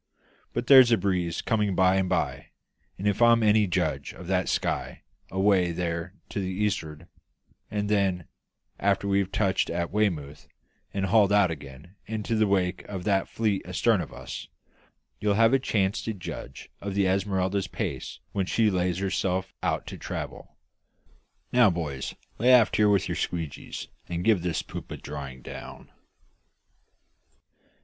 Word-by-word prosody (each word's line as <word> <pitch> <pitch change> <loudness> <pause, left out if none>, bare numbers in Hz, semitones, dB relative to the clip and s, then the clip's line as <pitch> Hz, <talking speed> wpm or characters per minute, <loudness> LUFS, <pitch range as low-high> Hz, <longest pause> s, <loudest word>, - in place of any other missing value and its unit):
But 120 - -2
there's 130 -2 +8
a 115 - +5
breeze 90 -5 -1
coming 105 -4 +1
by 95 +1 +4
and 95 -1 +1
by, - - -1 0.5
if 100 +3 0
I'm 115 -1 +6
any 105 -1 +4
judge 80 -7 -1
of 90 - -10
that 95 +1 0
sky - - -2 0.3
away 95 -2 +2
there 85 +2 -3
to - - -3
the 95 -2 -2
east'ard; 85 -5 -2 0.6
and 105 -1 -2
then, 95 -4 +1 0.5
after 100 0 +1
we've 100 -1 +1
touched 100 -2 +1
at 85 0 -2
Weymouth 80 -9 -1 0.4
and 95 -1 -1
hauled 100 0 +4
out 100 -4 +4
again 75 +5 -10
into 110 0 -3
the 110 -1 +3
wake 90 -2 0
of 95 -3 -6
that 100 -1 +1
fleet 105 -4 0
astarn 95 +3 +1
of 80 - -7
us, - - -7 0.7
you'll 105 -1 +1
have 115 +3 +5
a 135 - +5
chance 100 -5 0
to 110 - -2
judge 85 -8 -8
of 100 -1 -4
the 100 -1 +3
Esmeralda's 95 0 0
paces - - -5
when 95 -2 -1
she 110 0 +2
lays 90 -1 0
herself 95 -1 -1
out - - -1
to - - -8
travel. - - -6 0.9
Now, 120 -3 +6
boys, 75 -7 -4 0.2
lay 120 +4 +3
aft 120 -4 +6
here 105 -1 +5
with 100 -2 +2
your - - -2
squeegees, 80 -5 -4 0.2
and 85 0 -2
give 105 -4 +3
this 85 -3 -1
poop - - -8
a - - -6
drying 70 -3 -8
down!" - - -9
95 Hz, 155 wpm, -27 LUFS, 90-105 Hz, 0.9 s, there's